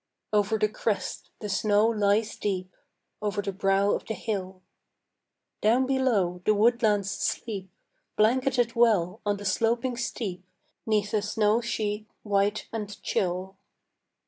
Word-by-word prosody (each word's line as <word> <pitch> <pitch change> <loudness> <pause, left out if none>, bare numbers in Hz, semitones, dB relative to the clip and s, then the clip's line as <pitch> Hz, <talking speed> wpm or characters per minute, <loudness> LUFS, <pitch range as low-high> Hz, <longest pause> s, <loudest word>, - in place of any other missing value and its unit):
Over 210 +1 +2
the 215 - +2
crest 210 -2 -3
the 210 - -3
snow 205 +1 +3
lies 215 -1 +2
deep, 185 -2 -3 0.5
Over 210 0 -1
the 195 - -2
brow 195 +1 +2
of - - -1
the 220 - -2
hill. 190 -4 -4 1.0
Down 235 +5 +4
below 230 -10 +1
the 215 - +3
woodlands 210 -3 +3
sleep, 195 -5 -3 0.5
Blanketed 245 +1 +2
well 215 -5 +3
on 205 0 +1
the 205 - -8
sloping 230 +5 +1
steep 210 -6 -4 0.4
'Neath 210 -1 +1
a 215 - +2
snow 210 +2 +2
sheet 215 -2 -2 0.2
white 205 0 +1
and 210 -2 -5
chill. 185 +1 -1
210 Hz, 130 wpm, -27 LUFS, 195-225 Hz, 1.0 s, Down